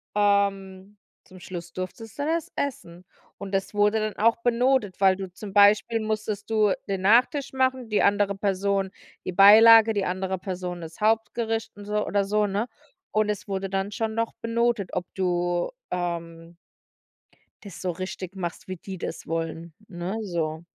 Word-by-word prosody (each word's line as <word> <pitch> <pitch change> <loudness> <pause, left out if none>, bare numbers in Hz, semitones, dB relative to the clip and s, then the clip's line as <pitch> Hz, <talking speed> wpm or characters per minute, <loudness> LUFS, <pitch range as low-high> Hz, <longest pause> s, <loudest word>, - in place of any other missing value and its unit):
ähm, 200 -1 0 0.3
zum 185 0 -15
Schluss 175 0 -8
durftest 195 +6 -7
dann 290 +2 -1
es 330 -1 -1
essen. 185 -10 -5 0.3
Und 200 -1 -7
das 195 +2 -1
wurde 210 +1 +3
dann 215 -1 -2
auch 230 +2 +3
benotet, 240 -4 +1
weil 190 -1 +5
du 190 -2 -7
zum 195 +1 -9
Beispiel 210 +3 +5
musstest 215 -1 -3
du 215 -3 +3
den 195 -1 -2
Nachtisch 250 +7 +3
machen, 260 -2 0
die 210 - +2
andere 200 0 +2
Person 195 0 0 0.3
die 185 - -2
Beilage, 220 +3 +8
die 200 -2 -1
andere 190 +1 -2
Person 180 -2 -5
das 165 0 -10
Hauptgericht 225 +1 0
und 205 - -10
so 210 0 -1
oder 200 0 +1
so, 210 +1 +1
ne? 205 +5 -1 0.4
Und 215 0 +1
es 210 0 -3
wurde 195 -1 -3
dann 195 +1 -2
schon 220 0 -2
noch 230 0 -1
benotet, 230 -3 0
ob 180 -1 -2
du, 175 -2 0 0.2
ähm 170 -1 -4 1.1
das 200 -4 -10
so 180 -1 -1
richtig 185 +1 -6
machst, 185 +3 -5
wie 185 - -4
die 190 +2 -8
das - - -6
wollen, 165 0 -4
ne, 180 +3 -4
so. 165 -4 -3
200 Hz, 165 wpm, -25 LUFS, 185-220 Hz, 1.1 s, Beilage